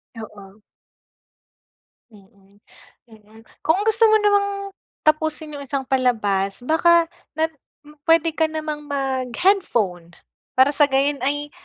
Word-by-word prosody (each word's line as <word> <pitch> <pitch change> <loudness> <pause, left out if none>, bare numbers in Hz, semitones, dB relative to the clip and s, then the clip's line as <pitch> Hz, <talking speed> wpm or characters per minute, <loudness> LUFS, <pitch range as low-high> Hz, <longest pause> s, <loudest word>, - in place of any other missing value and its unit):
Oo. 210 -2 -12 1.5
Mm 200 -1 -22 0.6
mm, 220 0 -18 0.2
kung 370 +6 +1
gusto 445 +1 +2
mo 435 - +4
namang 405 -1 +2 0.6
tapusin 310 0 0
yung - - -7
isang 275 0 -3
palabas 225 -6 0
baka 335 +4 +4 0.3
na 320 +1 0 0.6
pwede 330 0 +4
ka 320 0 +1
namang 310 -1 -5
mag 270 -2 -2
headphone. 210 - 0 0.4
Para 260 +2 +5
sa 290 0 +4
gayon 275 +1 +1
ay 290 +2 -2
280 Hz, 115 wpm, -21 LUFS, 220-320 Hz, 1.5 s, Para